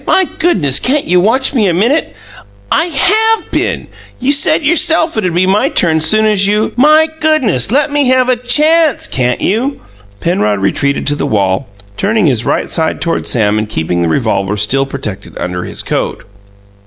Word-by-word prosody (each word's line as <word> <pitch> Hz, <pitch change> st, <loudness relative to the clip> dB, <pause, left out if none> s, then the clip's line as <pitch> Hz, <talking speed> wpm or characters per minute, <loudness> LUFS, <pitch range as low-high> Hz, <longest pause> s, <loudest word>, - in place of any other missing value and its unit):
My 380 Hz, -, +3 dB
goodness! 145 Hz, -, +1 dB
Can't 280 Hz, +3 st, +1 dB
you 180 Hz, 0 st, +2 dB
watch 240 Hz, +9 st, +1 dB
me 220 Hz, -7 st, +2 dB
a 175 Hz, -, 0 dB
minute?" 240 Hz, -, 0 dB, 0.6 s
"I -, -, +2 dB
HAVE 430 Hz, +9 st, +1 dB
been! -, -, -2 dB, 0.3 s
You 255 Hz, +3 st, +1 dB
said 305 Hz, +2 st, +2 dB
yourself 320 Hz, +1 st, +1 dB
it'd 195 Hz, -5 st, -1 dB
be 180 Hz, +2 st, +2 dB
my 195 Hz, +3 st, +1 dB
turn 160 Hz, -2 st, +1 dB
soon 215 Hz, +8 st, +2 dB
as 205 Hz, -2 st, +2 dB
you 210 Hz, +2 st, 0 dB
" -, -, -27 dB
"My 305 Hz, +5 st, +4 dB
goodness! 260 Hz, -, +1 dB
Let 285 Hz, +3 st, +2 dB
me 290 Hz, -2 st, +1 dB
have 255 Hz, 0 st, +2 dB
a 255 Hz, -, +2 dB
CHANCE, 300 Hz, +4 st, +2 dB
can't 125 Hz, -1 st, -1 dB
you?" 245 Hz, +8 st, -1 dB, 0.4 s
Penrod 105 Hz, -, 0 dB
retreated 140 Hz, +8 st, -1 dB
to 145 Hz, -, 0 dB
the 145 Hz, -, -3 dB
wall, 95 Hz, -6 st, -1 dB, 0.3 s
turning 215 Hz, 0 st, +1 dB
his 120 Hz, -6 st, 0 dB
right -, -, -1 dB
side 160 Hz, -1 st, -1 dB
toward 165 Hz, 0 st, -2 dB
Sam 110 Hz, -3 st, +1 dB
and 110 Hz, 0 st, -4 dB
keeping 85 Hz, -3 st, -2 dB
the 85 Hz, -, 0 dB
revolver 105 Hz, -2 st, -1 dB
still 135 Hz, +7 st, 0 dB
protected 130 Hz, -8 st, -7 dB
under 90 Hz, 0 st, -4 dB
his -, -, -5 dB
coat. -, -, -3 dB
200 Hz, 180 wpm, -12 LUFS, -, 0.6 s, My